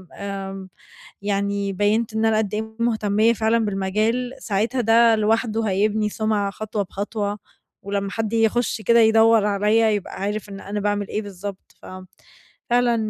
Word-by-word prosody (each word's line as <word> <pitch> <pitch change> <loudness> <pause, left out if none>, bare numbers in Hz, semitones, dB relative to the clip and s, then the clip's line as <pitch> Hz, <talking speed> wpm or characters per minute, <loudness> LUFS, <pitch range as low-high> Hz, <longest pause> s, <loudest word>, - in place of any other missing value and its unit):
آمم، 195 -1 -6 0.5
يعني 200 0 -1
بيّنت 215 +3 0
إن 220 0 0
أنا 220 -1 +3
قدّ 210 -1 -1
إيه 220 +1 -5
مهتمية 220 -1 +2
فعلًا 225 +1 +1
بالمجال، 215 +6 -1
ساعتها 225 +5 -1
ده 230 0 +5
لوحده 225 +1 +1
هيبني 210 +2 +1
سمعة 210 -2 -1
خطوة 215 0 -4
بخطوة، 205 +2 -4 0.4
ولمّا 200 0 -3
حد 225 0 -3
يخش 225 +1 +1
كده 235 +1 +4
يدوّر 225 -1 +5
عليَّ 210 +2 +2
يبقى 200 - -7
عارف 205 +1 -3
إن 195 0 -8
أنا 205 +1 -4
باعمل 205 0 -1
إيه 215 - -3
بالضبط. 200 0 -9
ف - - -12 0.8
فعلًا 240 -1 +3
215 Hz, 145 wpm, -22 LUFS, 200-225 Hz, 0.8 s, ده